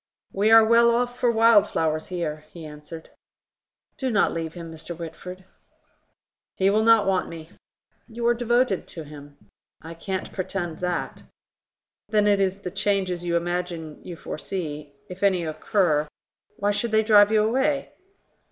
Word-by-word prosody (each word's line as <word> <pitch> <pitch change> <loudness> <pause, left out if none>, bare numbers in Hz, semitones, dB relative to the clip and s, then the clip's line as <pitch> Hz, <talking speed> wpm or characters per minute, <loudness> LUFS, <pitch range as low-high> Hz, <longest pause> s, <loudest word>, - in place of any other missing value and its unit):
"We 205 +3 +2
are 225 0 +8
well 235 +1 +5
off 245 +1 0
for 245 - +2
wild 225 -2 +5
flowers 155 -1 -1
here," 160 -4 -4
he 165 -1 -11
answered. 150 +2 -11 0.9
"Do 265 - -1
not 210 -4 +2
leave 165 0 -5
him, 170 -1 -8
Mr. 160 +1 -9
Whitford." 180 +3 -9 1.1
"He 195 +1 +2
will 215 +2 +2
not 225 -2 +5
want 190 -1 0
me." 165 +1 -10 0.6
"You 235 0 -6
are 240 - +4
devoted 240 -3 0
to 165 - -8
him." 145 -1 -13 0.4
"I 165 +1 -9
can't 190 +3 -5
pretend 180 -3 -4
that." 180 -1 -3 0.9
"Then 210 -1 +2
it 205 -1 +3
is 195 0 0
the 180 - -5
changes 190 -3 -1
you 170 -1 0
imagine 170 -2 -4
you 175 - -8
foresee... 155 -3 -6 0.2
If 180 +1 -10
any 190 -4 +2
occur, 155 -1 0 0.5
why 205 +1 0
should 205 +3 -1
they 220 0 +3
drive 210 -1 +6
you 215 -1 +4
away?" 270 +6 0
185 Hz, 155 wpm, -24 LUFS, 165-220 Hz, 1.1 s, are